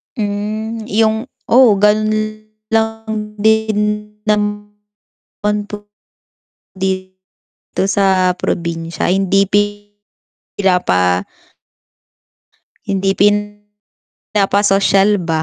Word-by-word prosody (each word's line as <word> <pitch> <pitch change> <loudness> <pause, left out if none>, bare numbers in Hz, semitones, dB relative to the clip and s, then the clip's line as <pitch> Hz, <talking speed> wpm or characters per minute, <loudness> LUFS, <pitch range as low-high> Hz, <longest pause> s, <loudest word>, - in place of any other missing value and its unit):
Mm, 215 +2 -3
yung 220 +2 +1 0.2
oo 245 -3 +6
ganun 215 +1 0 0.2
lang 220 -1 -2
din 220 0 +2 0.4
naman 205 -1 -3 0.7
po 205 0 -8 0.9
dito 185 0 -4 0.5
sa 190 -2 +2
probinsya 170 -1 -2
hindi 195 +1 +2
pi 205 +1 +3 1.0
sila 185 -2 +3
pa 90 +1 +1 1.6
Hindi 195 0 0 1.0
pinanapasosyal 200 0 +2
ba. 160 -2 -1
205 Hz, 70 wpm, -16 LUFS, 190-215 Hz, 1.6 s, oo